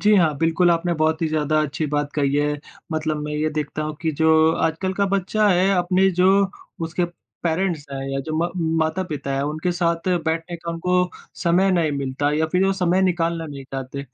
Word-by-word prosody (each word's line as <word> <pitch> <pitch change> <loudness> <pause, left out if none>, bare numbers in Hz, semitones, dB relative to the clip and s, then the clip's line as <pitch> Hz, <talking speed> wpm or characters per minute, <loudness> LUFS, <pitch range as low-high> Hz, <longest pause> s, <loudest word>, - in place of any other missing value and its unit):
जी 210 +1 +5
हाँ। 160 -4 +4
बिल्कुल, 165 +2 +3
आपने 170 +1 +1
बहुत 160 +1 +1
ही 160 - +1
ज़्यादा 155 0 +1
अच्छी 150 +1 -2
बात 145 0 -1
कही 140 -1 +1
है। 145 0 +1 0.3
मतलब 155 -1 -1
मैं 150 - -4
ये 155 +1 0
देखता 155 0 -3
हूँ 155 0 -3
कि 160 - +1
जो 160 0 +5
आजकल 165 +5 -1
का 200 0 +1
बच्चा 200 +2 +1
है 185 +1 +3
अपने 185 +2 +3
जो 180 +1 +3 0.6
उसके 175 +2 -1 0.4
पेरेंट्स 170 -2 0
हैं 135 - -4
या 135 - -1
जो 155 +3 -4
मा 170 +2 +1 0.4
माता-पिता 155 -5 -3
हैं 135 - 0
उनके 155 +5 -1
साथ 170 0 0 0.2
बैठने 165 +2 -2
का 170 0 -6
उनको 180 +2 +1 0.3
समय 185 +3 +3
नहीं 165 -4 +1
मिलता 140 +1 -1
या 160 +1 +1
फिर 180 +4 +1
वो 195 - +3
समय 185 0 +1
निकालना 170 -2 0
नहीं 140 -2 -8
चाहते। 135 +1 -6
160 Hz, 200 wpm, -22 LUFS, 150-180 Hz, 0.6 s, जी